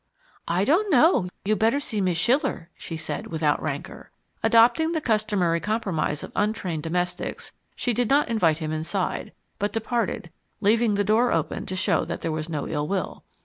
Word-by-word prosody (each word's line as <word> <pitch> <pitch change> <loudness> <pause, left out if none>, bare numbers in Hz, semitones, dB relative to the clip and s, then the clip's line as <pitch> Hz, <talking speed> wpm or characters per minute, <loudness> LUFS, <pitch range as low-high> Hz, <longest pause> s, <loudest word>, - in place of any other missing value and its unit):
"I 175 +3 +1
don't 365 - +3
know, 295 - +4 0.2
you'd 215 +1 +1
better 225 +6 +3
see 220 -7 -2
Miz' 180 -3 +1
Schiller," 240 - +1
she 165 - -7
said, 155 - -4
without 155 -3 0
rancour. 145 -2 -5 0.3
Adopting 240 +9 +4
the 320 - +1
customary 210 - +1
compromise 190 -8 -1
of - - -8
untrained 195 -7 -1
domestics, 175 +3 -3 0.2
she 245 - -1
did 240 0 0
not 285 +2 +4
invite 180 -10 +2
him 155 -1 -4
inside, 165 +4 -2 0.3
but 205 +1 0
departed, 230 +1 -2 0.3
leaving 220 +1 +3
the 205 - +2
door 220 +5 +3
open 160 -1 -1
to 185 - -3
show 185 - +1
that 170 - -5
there 165 - -2
was 155 +1 -4
no 150 -3 -3
ill 150 -1 -2
will. 190 -3 -3
200 Hz, 175 wpm, -25 LUFS, 165-230 Hz, 0.3 s, know